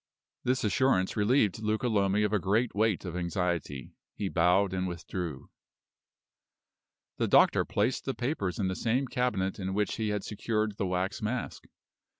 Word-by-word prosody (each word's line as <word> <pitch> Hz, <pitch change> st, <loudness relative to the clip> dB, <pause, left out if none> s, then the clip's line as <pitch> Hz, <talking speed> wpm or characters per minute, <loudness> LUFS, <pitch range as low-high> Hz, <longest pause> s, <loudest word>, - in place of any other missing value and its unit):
This 125 Hz, +1 st, +1 dB
assurance 105 Hz, -2 st, +2 dB
relieved 105 Hz, -1 st, +2 dB
Luca 110 Hz, +2 st, 0 dB
Lomi 100 Hz, -2 st, +2 dB
of 105 Hz, 0 st, 0 dB
a 105 Hz, -, +3 dB
great 110 Hz, +6 st, +1 dB
weight 105 Hz, -2 st, +1 dB
of 90 Hz, -2 st, -5 dB
anxiety. 85 Hz, -6 st, -2 dB, 0.2 s
He 100 Hz, -, -2 dB
bowed 90 Hz, +3 st, +3 dB
and 95 Hz, 0 st, -1 dB
withdrew. 85 Hz, -3 st, -5 dB, 1.7 s
The -, -, +1 dB
doctor -, -, +5 dB
placed 110 Hz, +5 st, 0 dB
the 135 Hz, -, -2 dB
papers 120 Hz, -, -2 dB
in 100 Hz, -, 0 dB
the 95 Hz, -, -2 dB
same 125 Hz, +6 st, 0 dB
cabinet 105 Hz, -8 st, -1 dB
in 95 Hz, 0 st, -3 dB
which 105 Hz, 0 st, 0 dB
he 110 Hz, -1 st, -1 dB
had 105 Hz, -1 st, -2 dB
secured 110 Hz, 0 st, -2 dB
the 95 Hz, -, -1 dB
wax 90 Hz, +2 st, -2 dB
mask. 120 Hz, +4 st, -3 dB
100 Hz, 155 wpm, -29 LUFS, 95-110 Hz, 1.7 s, doctor